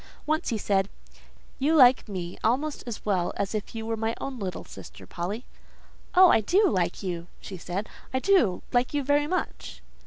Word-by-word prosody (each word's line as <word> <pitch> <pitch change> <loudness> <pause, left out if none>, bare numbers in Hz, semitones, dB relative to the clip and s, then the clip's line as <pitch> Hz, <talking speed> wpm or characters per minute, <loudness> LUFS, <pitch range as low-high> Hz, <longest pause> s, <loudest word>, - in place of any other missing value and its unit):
Once 310 +1 0
he 230 - 0
said:—"You 205 +9 -3
like 255 -5 +6
me 180 -3 -5
almost 275 +6 0
as 235 - -6
well 185 -4 0
as 200 +1 -2
if 215 +1 -4
you 225 0 -4
were 225 0 -1
my 225 +1 -2
little 220 -9 -5
sister, - - -12
Polly." 200 +8 -5 0.7
"Oh! 370 -1 +8
I - - +4
do 390 - +3
like 180 - 0
you," 175 -2 -4
said 190 +2 -5
she; - - -19 0.2
"I 260 - 0
do 260 - +3
like 245 +4 +1
you 290 - +1
very 290 +2 +2
much." 365 +3 -4
225 Hz, 175 wpm, -27 LUFS, 195-285 Hz, 0.7 s, Oh